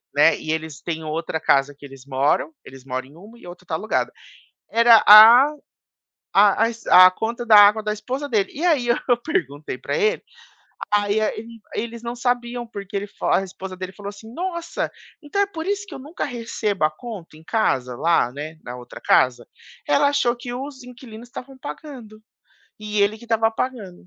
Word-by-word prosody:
né. 150 +3 +5
E 155 - -5
eles 160 -2 -5
têm 160 -2 -5
outra 160 +1 -3
casa 140 0 +1
que 145 - -13
eles 135 -1 -13
moram. 140 - 0
Eles 135 0 -13
moram 130 0 -5
em 145 - -19
uma, 210 +7 -15
e - - -16
a - - -9
outra 180 +1 -13
está 160 - -3
alugada. 215 +7 -2 0.6
Era 230 -1 +6
a 225 +6 +10 0.9
a 205 +2 +5
as 230 0 -7
a 185 0 +9
conta 235 +4 -4
da 220 - +5
água 205 +1 +7
da 210 0 -2
esposa 255 +7 -5
dele. 210 -5 0
E 315 +5 -4
aí 285 -9 +2
eu 235 - +3
eu 245 - +4
perguntei 150 - -3
pra - - -3
ele. 440 +1 +1 0.8
Aí 205 +1 +1
ele, 225 +1 -4 0.2
eles 235 0 -5
não 235 +1 -5
sabiam 245 0 -2
porque 200 -3 -9
ele 200 +1 -2
fa 195 - 0
a - - -4
esposa 190 0 -9
dele 185 0 -6
falou 200 0 -10
assim: 220 +3 -12
"Nossa, 340 0 -4 0.3
então 300 +7 -2
é - - +3
por 325 -4 -7
isso 405 0 -2
que 350 - -11
eu - - -8
nunca 295 +6 -6
recebo 225 - -2
a 155 - 0
conta 185 -3 -10
em 160 - -17
casa 130 - -1
lá, 160 -6 +2
né. 155 +3 -8
Na 125 0 -7
outra 125 0 -12
casa", 125 -1 +2 0.4
ela 285 0 +3
achou 255 -4 +1
que 245 0 -7
os 265 +1 -7
inquilinos 245 -2 -12
estavam 265 +1 -10
pagando 220 - -10 0.6
e 210 -1 -3
ele 210 +2 0
que 235 - -14
estava 225 -1 +1
pagando. 220 -7 -5
215 Hz, 195 wpm, -22 LUFS, 170-245 Hz, 0.9 s, a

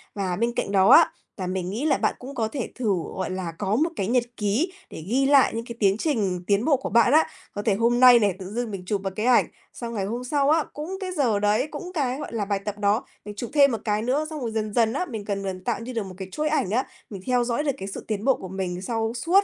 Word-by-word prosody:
Và 190 -3 -1
bên 235 +5 0
cạnh - - -2
đó 195 -1 +4
á, - - +8 0.3
là 185 - -3
mình 185 -1 -2
nghĩ 225 +9 -3
là 310 - +3
bạn - - 0
cũng 270 +2 -9
có 225 -3 0
thể 255 +1 -4
thử, 235 -5 0 0.2
gọi 190 - -3
là, 185 -2 -3
có 205 0 0
một 310 +8 +2
cái 195 - -2
nhật 245 +2 +2
ký 220 - 0 0.2
để 160 - -8
ghi 260 +6 +2
lại 275 -1 +5
những 230 0 -3
cái 235 - -7
tiến 195 -1 +3
trình 205 - -1
tiến 205 +3 +2
bộ 295 -4 +4
của 265 - -5
bạn 235 +1 +4
á. 315 +1 +5 0.3
Có 205 - -3
thể 210 0 +2
hôm 235 +3 +2
nay 250 -1 +8
này, 200 -4 +1
tự 190 0 -7
dưng 240 -1 -2
mình 195 -2 -6
chụp 200 +1 -1
một 195 - -1
cái 215 - -2
ảnh, 250 -1 +5 0.3
xong 235 -1 -6
ngày 200 -4 -2
hôm 235 +5 -4
sau 280 +2 +1
á, 315 +1 +4
cũng 320 +6 -5
cái 375 -2 -4
giờ 250 - +1
đấy, 210 +6 +2
cũng 355 +4 -6
cái, 270 -5 -1
gọi 295 - -6
là, 215 -3 -1
bài 200 0 -1
tập 210 -1 -4
đó, 205 +2 +1 0.2
mình 210 0 -7
chụp 235 +3 -5
thêm 280 -2 +6
một 225 -3 -3
cái 210 -1 +1
nữa, 265 +7 0
xong 310 -1 -6
rồi 235 -3 -3
dần 215 -1 -2
dần 225 -1 +2
á, 325 +7 -1
mình 225 - -6
gần 200 -1 -3
gần 185 -1 -5
tạo - - -1
như 240 +2 -7
được 225 -3 -1
một 185 -1 -9
cái 190 -1 -6
chuỗi 305 +5 -1
ảnh 300 -11 0
á, 250 +4 +1 0.2
mình 195 -3 -8
theo 250 -1 +2
dõi 240 +4 -1
được 290 - +1
cái 195 - -6
sự 195 - -7
tiến 215 0 -3
bộ 270 - +4
của 190 - -8
mình 185 -1 -4
sau 225 +2 -1
suốt 345 +11 +3
225 Hz, 295 wpm, -25 LUFS, 200-260 Hz, 0.3 s, á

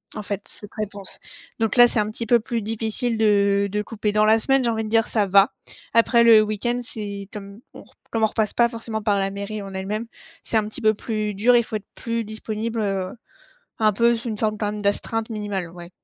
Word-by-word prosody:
en 210 - -5
fait, 200 -1 -4
cette 205 - -6
réponse, 205 -2 -4 0.4
donc 225 -2 0
là, 240 0 +9
c'est 235 - +1
un 210 0 0
petit 225 +2 -3
peu 235 +1 +4
plus 230 +1 -3
difficile 225 +2 0
de 200 -2 +3
de 210 +1 -1
couper 210 0 -3
dans 215 0 +4
la 220 +1 +5
semaine, 270 +3 +2
j'ai 235 - +2
envie 220 -1 -2
de - - -5
dire 225 0 +2
ça 215 -3 +1
va. 195 +1 +5 0.4
Après 235 +1 +4
le 225 -2 +8
week-end, 215 +3 -1
c'est 200 -3 -5
comme 200 0 -9 0.2
on - - -11
r - - -23 0.2
comme 225 -1 0
on - - +6
repasse 215 -1 -1
pas 235 - +4
forcément 225 -2 -4
par 205 -2 +2
la 195 0 0
mairie 200 +2 -5
en 195 -1 -8
elle-même, 205 +4 -3 0.4
c'est 225 - 0
un 215 -1 0
petit 215 +5 -3
peu 215 -1 +4
plus 215 -1 -3
dur, 235 +5 +4
il 235 - +4
faut 220 - -6
être 205 - -15
plus 230 -1 -3
disponible, 220 +1 -4
heu, 195 -3 -2 0.7
un 215 -2 +3
peu 235 +3 +3
sous 235 +1 -6
une 215 -2 -4
forme 215 0 -1
quand 210 - -1
même 210 0 -6
d'astreinte 220 +3 -1
minimale 205 -5 -4
ouais. 175 0 -11
215 Hz, 235 wpm, -23 LUFS, 205-225 Hz, 0.7 s, là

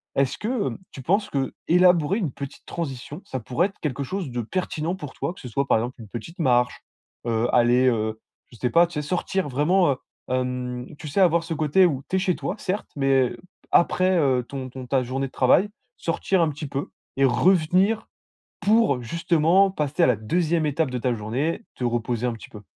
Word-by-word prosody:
Est-ce 135 -1 +1
que, 225 -1 -1
hem, - - -4
tu 135 - -9
penses 200 - +1
que 135 -1 -1
élaborer 180 +1 +4
une 170 - -1
petite 140 +1 -8
transition, 145 0 -5
ça 130 - -4
pourrait 130 - 0
être 195 - -23
quelque 140 -2 -2
chose 185 +2 -4
de 120 -1 -3
pertinent 165 - -2
pour 145 -7 -8
toi? - - -3
Que - - -16
ce - - -7
soit 140 +4 -1
par 115 - +4
exemple 120 +3 -5
une 110 - -10
petite 120 - -8
marche, 125 -5 +2 0.4
heu, 115 0 +1
aller, 125 +1 +4
heu, 110 -2 0 0.3
je 120 - -14
sais 125 - 0
pas, 170 +6 +5
tu 175 - -15
sais, 150 - -1
sortir 180 +2 -1
vraiment, 165 +7 +3
heu 130 - -2 0.3
hem, 125 -1 -2
tu - - -7
sais, 145 - -1
avoir 170 -2 +4
ce 165 -1 -4
côté 155 +5 +4
où 140 -5 -3
tu 190 - +1
es - - +2
chez 185 -2 +1
toi, - - -3
certes, 195 +3 -3
mais 135 -3 +2
p - - -8 0.3
après, 185 +2 +3
heu, 130 -4 +2
ton 135 -2 -6
ton 130 0 -8
ta 135 0 +2
journée 130 +2 -2
de - - -16
travail, 175 +10 +3 0.3
sortir 175 +2 0
un 160 - +2
petit 150 +1 -6
peu 140 +1 -4 0.3
et 135 - +4
revenir 185 - +3 0.5
pour 210 - +3
justement 170 +7 +3
passer 150 -6 -1
à - - +7
la 125 - +3
2ème 160 - 0
étape 150 0 0
de 125 - -2
ta 125 0 0
journée: 125 - -2
te 125 - -4
reposer 120 0 -1
un 120 - 0
petit 115 - -11
peu. 105 - -11
140 Hz, 215 wpm, -24 LUFS, 125-175 Hz, 0.5 s, à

